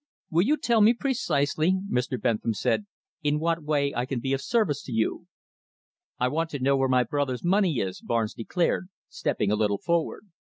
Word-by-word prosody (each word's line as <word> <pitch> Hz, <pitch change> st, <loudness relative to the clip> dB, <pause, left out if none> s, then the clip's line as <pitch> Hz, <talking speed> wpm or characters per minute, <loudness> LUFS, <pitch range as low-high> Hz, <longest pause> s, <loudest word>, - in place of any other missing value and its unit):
"Will 165 Hz, +1 st, +4 dB
you 290 Hz, +11 st, +2 dB
tell 235 Hz, -5 st, +2 dB
me 225 Hz, +3 st, +6 dB
precisely," 180 Hz, -, +1 dB
Mr. 125 Hz, -4 st, -1 dB
Bentham 110 Hz, 0 st, 0 dB
said, 205 Hz, -, 0 dB, 0.3 s
"in 150 Hz, -1 st, +1 dB
what 165 Hz, +1 st, 0 dB
way 145 Hz, -2 st, 0 dB
I 120 Hz, +2 st, -2 dB
can 130 Hz, -2 st, -2 dB
be 135 Hz, +3 st, -1 dB
of 135 Hz, -, -1 dB
service 165 Hz, -, +1 dB
to -, -, -7 dB
you?" 110 Hz, -1 st, -1 dB, 0.9 s
"I 125 Hz, -, +1 dB
want 160 Hz, +5 st, -1 dB
to 145 Hz, -, -5 dB
know 135 Hz, +2 st, +3 dB
where 135 Hz, -1 st, +1 dB
my 125 Hz, -1 st, +4 dB
brother's 130 Hz, 0 st, -2 dB
money 180 Hz, -4 st, +2 dB
is," 95 Hz, -4 st, -3 dB
Barnes 115 Hz, -2 st, -1 dB
declared, 175 Hz, +8 st, -1 dB, 0.2 s
stepping 105 Hz, -1 st, -1 dB
a -, -, +3 dB
little 105 Hz, -1 st, +1 dB
forward. 170 Hz, -, -2 dB
145 Hz, 190 wpm, -26 LUFS, 125-170 Hz, 0.9 s, me